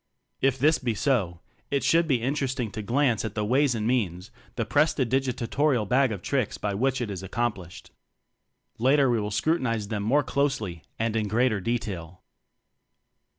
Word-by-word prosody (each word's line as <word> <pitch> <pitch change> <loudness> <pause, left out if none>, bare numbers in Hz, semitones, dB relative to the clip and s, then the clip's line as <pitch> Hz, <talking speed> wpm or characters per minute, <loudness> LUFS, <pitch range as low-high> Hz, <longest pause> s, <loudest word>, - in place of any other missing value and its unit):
If 135 -1 +2
this 155 +4 +3
be 120 -3 -1
so, 100 - 0 0.3
it 140 -1 0
should 165 0 +3
be 125 -6 +1
interest 135 0 -1
ing 115 -4 -2
to 110 - -5
glance 120 0 +1
at 110 -3 -5
the 105 -1 -1
ways 130 +3 +2
and 110 -1 -2
means, 100 -6 -1 0.2
the 115 - -1
prestidigitatorial 130 -2 +1
bag 130 +1 +3
o 105 - -2
tricks 125 +8 -2
by 105 -1 -2
which 130 +5 0
it 110 -4 -3
is 95 -2 -5
accomplished. 95 -3 -4 0.9
Later 135 +2 +4
we 120 - +1
will 105 - -3
scrutinize 115 -2 0
them 105 -2 -2
more 135 +8 +2
closely 110 - -1 0.2
and 115 0 -1
in 110 -2 0
greater 110 0 +1
detail. 90 -6 -4
120 Hz, 165 wpm, -26 LUFS, 105-135 Hz, 0.9 s, Later